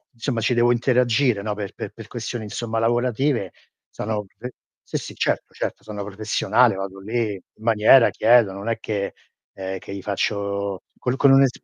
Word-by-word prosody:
insomma 120 0 -2
ci 120 +3 +1
devo 120 +1 +4
interagire 120 -2 +2
no, 105 0 -2
per 100 -2 -5
per - - -6
per - - -11
questioni, 120 -2 -5
insomma, 115 +2 -3
lavorative, 120 -1 +1 0.4
sono 105 -1 -3
ve 125 +2 -6 0.3
sì, - - -4
sì, - - -8
certo, - - -1
certo, - - -4
sono 105 -2 -6
professionale, 110 +3 +2
vado 95 0 -6
lì 110 +1 -1
in 95 +3 -15
maniera 115 +2 +6
chiedo, 115 -3 +4
non 100 +4 -6
è 115 - 0
che 100 -2 -3 0.4
ehm, 95 0 -4
che 100 - -9
gli 100 - -6
faccio 100 0 -2 0.2
con 125 - -1
con 140 0 +5
un'es 135 -1 +6
110 Hz, 175 wpm, -23 LUFS, 100-120 Hz, 0.4 s, maniera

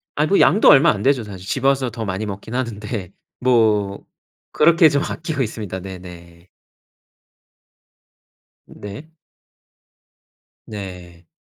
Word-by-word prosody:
아 150 - +2
뭐 195 +5 +2
양도 185 +10 +5
얼마 145 0 +7
안 105 -1 -4
되죠, 135 -3 +2
사실. 95 -3 -10
집 135 +3 -3
와서 135 -2 +2
더 110 0 -5
많이 100 +2 -3
먹긴 105 +3 -7
하는데. 110 -6 -4 0.3
뭐 110 -5 +1 0.5
그렇게 165 +1 +5
좀 145 -1 0
아끼고 160 -4 -4
있습니다. 105 -4 -5
네네. 90 -2 -11 2.2
네. 105 +10 -10 1.6
네. 90 -5 -9
110 Hz, 200 characters per minute, -20 LUFS, 95-135 Hz, 2.2 s, 얼마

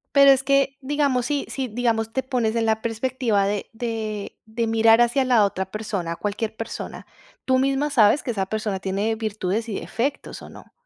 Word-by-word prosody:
Pero 275 -1 +8
es 270 -1 +2
que, 275 0 +2
digamos, 275 -3 0
sí 290 -2 -1
sí, 265 -2 -3
digamos, 225 -1 -1
te 265 - -1
pones 240 -4 -1
en 225 -1 +1
la 220 0 +1
perspectiva 230 -3 0
de 205 0 -3
de 220 -3 -4
de 230 +1 -2
mirar 225 0 +5
hacia 240 +3 +3
la 240 -5 +4
otra 190 -1 -2
persona, 195 -6 -3
cualquier 215 +3 -3
persona, 225 +1 -6 0.4
tú 260 0 +2
misma 275 +2 +1
sabes 230 0 +4
que 245 - -1
esa 195 -3 -2
persona 210 -2 -3
tiene 200 +4 -1
virtudes 215 0 -2
y 205 - -3
defectos, 275 +5 -4
¿o - - -10
no? - - -14
225 Hz, 190 wpm, -23 LUFS, 215-260 Hz, 0.4 s, Pero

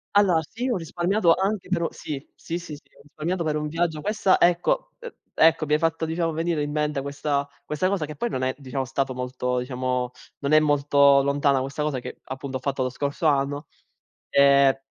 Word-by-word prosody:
Allora 185 -5 +5
sì, 245 +3 -3
ho 240 - +1
risparmiato 175 +2 +2
anche 195 -1 -2
però 170 -3 +1
sì, 145 -2 -6
sì, 170 - -5
sì, 160 -3 -8
sì 145 - -14 0.2
ho - - -17
risparmiato 165 +4 -3
per 155 -1 -1
un 150 0 -2
viaggio. 160 -1 -1
Questa 210 -2 +2
ecco, 180 - +2
ehm 480 -1 -9 0.2
ecco 160 -1 +4
mi 150 - 0
hai 150 - +4
fatto, 165 0 0
diciamo, 165 0 -1
venire 165 -1 -1
in 145 0 -2
mente 150 -2 -1
questa 140 0 -2 0.2
questa 150 +5 0
cosa 190 -5 0
che 150 0 -8
poi 240 - -2
non 130 - -2
è, 130 - 0
diciamo, 135 -1 -4
stato 135 +1 -2
molto, 125 0 -2
diciamo 125 0 -2 0.3
non 140 +1 -2
è 155 - +7
molto 140 -2 +4
lontana 140 -1 +2
questa 140 +3 -3
cosa 145 -4 -1
che - - -9
appunto 130 0 -5
ho - - -10
fatto 135 0 -1
lo 130 - -1
scorso 140 +5 -3
anno. 145 +1 0 0.6
Ehm, 140 -1 +5
150 Hz, 205 wpm, -24 LUFS, 140-165 Hz, 0.6 s, è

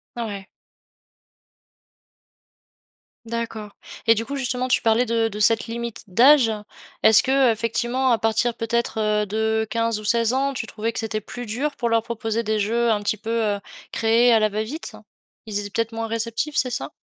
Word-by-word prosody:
Mouais. 205 -5 -5 2.8
D'accord. 225 -2 -5 0.3
Et 225 0 +6
du 225 - -2
coup, 280 - -5
justement, 255 -1 -1
tu - - +2
parlais 230 +2 +3
de 230 -1 +1
de 210 0 -7
cette 225 +2 +3
limite 235 0 -5
d'âge. 245 +5 +5 0.5
Est-ce 220 -1 +6
qu'effectivement, 250 0 +1
à 230 - +4
partir 225 +2 +1
peut-être, 230 0 -2
heu, 210 0 +1
de 220 +2 0
15 230 -1 0
ou - - -12
16 230 +2 +2
ans, 275 +1 0
tu 225 -3 -4
trouvais 225 +1 -3
que - - -5
c'était 220 -1 -3
plus 245 +3 -8
dur. 270 +7 -2
Pour 240 - -1
leur 230 -1 +2
proposer 225 0 -3
des 215 0 0
jeux 230 +3 +1
un 210 -1 +1
petit 205 +1 0
peu, 220 - -8 0.3
heu, - - -6 0.3
créés 230 +2 +4
à 225 - +5
la 215 0 +2
va-vite? 220 +10 -5 0.5
Ils 210 -2 -3
étaient 205 - -5
peut-être 230 +2 -2
moins 225 0 -3
réceptifs, 230 +6 -2
c'est 255 - +2
ça? 140 - -4
225 Hz, 175 wpm, -23 LUFS, 220-235 Hz, 2.8 s, Et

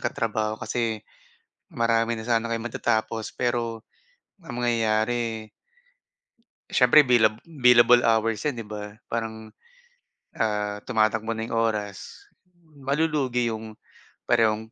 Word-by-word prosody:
katrabaho, 110 -2 -2
kasi 115 -3 -3 0.7
marami 115 0 +1
na 110 - -6
sana 115 -1 +1
kayong 115 +1 -3
matatapos 110 -1 -2
pero 120 -2 -2 0.6
ang 120 -7 -7
mangyayari 115 -1 0 1.2
siyempre 135 +3 +6
bilab 110 -3 +4
billable 125 -6 +5
hours 110 -2 +1
'yan 145 -4 0
'di - - -10
ba. 105 0 -8
Parang, 110 -1 -5 0.9
ah, 105 -1 -1
tumatakbo 110 0 +1
na 110 0 -4
'yung 115 - -5
oras, 105 - -3 0.5
malulugi 140 -4 0
'yong 110 -1 -7 0.5
parehong 110 -1 +1
115 Hz, 105 wpm, -25 LUFS, 110-120 Hz, 1.2 s, siyempre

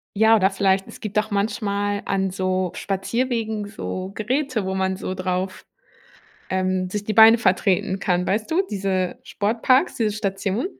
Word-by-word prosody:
ja, 220 +2 +5
oder 190 -3 +3
vielleicht, 195 -1 +1
es - - -12
gibt 210 -2 -5
auch 215 +1 -3
manchmal 205 0 -1
an 195 -1 0
so 185 -1 -1
Spazierwegen 220 +1 -2
so 190 -2 -5
Geräte, 255 -1 -1
wo 190 - -2
man 190 0 0
so 185 - -4
drauf, 185 0 -3 0.9
ähm, 185 0 0
sich 205 +2 -4
die 215 - -2
Beine 225 +2 +8
vertreten 190 -2 +1
kann, 180 -2 0
weißt 210 +3 -1
du, 340 +4 +3
diese 190 -2 -1
Sportparks, 235 - +1
diese 220 -3 0
Station? 200 - -2
200 Hz, 155 wpm, -22 LUFS, 190-220 Hz, 0.9 s, Beine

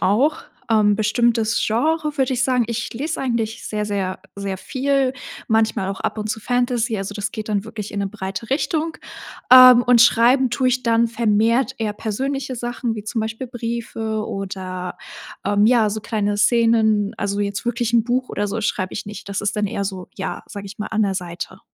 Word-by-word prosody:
auch. 270 +11 +2 0.3
Ähm, 210 -2 +4
bestimmtes 225 +1 +1
Genre 300 +6 0
würde 265 -1 +1
ich 250 0 0
sagen, 250 -2 +2
ich 235 -1 -3
lese 300 +6 -3
eigentlich 235 -3 -2
sehr 210 -1 -2
sehr 195 -3 -2 0.2
sehr 200 -1 -4
viel, 270 +3 0 0.3
manchmal 220 -4 +1
auch 195 - -6
ab - - -2
und 215 0 -4
zu 220 - -3
Fantasy. 245 -1 0
Also, 195 +1 -4
das 205 +1 -4
geht 215 -1 -5
dann 205 -1 0
wirklich 215 -2 -7
in 200 - -3
'ne 200 - 0
breite 195 +1 -6
Richtung, 320 +3 -1 0.6
ähm, 255 -1 +10
und 245 -1 +5
Schreiben 240 +3 +5
tue 255 +2 +1
ich 250 0 0
dann 230 0 +3
vermehrt 230 +3 +2
eher 215 -2 -1
persönliche 260 +5 -3
Sachen 240 -1 -3
wie 210 -1 -7
zum 225 +1 -2
Beispiel 225 +4 -4
Briefe 230 -2 -4
oder, 185 -2 -5 0.5
ähm, 205 +1 +3
ja, 225 -3 +4
so 215 - -3
kleine 205 -2 -1
Szenen. 220 -2 +3
Also, 200 0 -1
jetzt 200 +3 -3
wirklich 235 -1 -1
'n 235 -2 +4
Buch 255 +2 -1
oder 205 0 -1
so 210 - -3
schreibe 185 -2 -2
ich - - -4
nicht. 210 -1 -8
Das 200 0 -3
ist 210 +1 -1
dann 210 0 +1
eher 200 0 -3
so, 190 -2 -5
ja, 190 - -5
sage 200 -1 -7
ich 195 - -10
mal, 210 - -3
an 220 0 0
der 195 -2 0
Seite. 175 -2 -6
220 Hz, 195 wpm, -21 LUFS, 205-245 Hz, 0.6 s, ähm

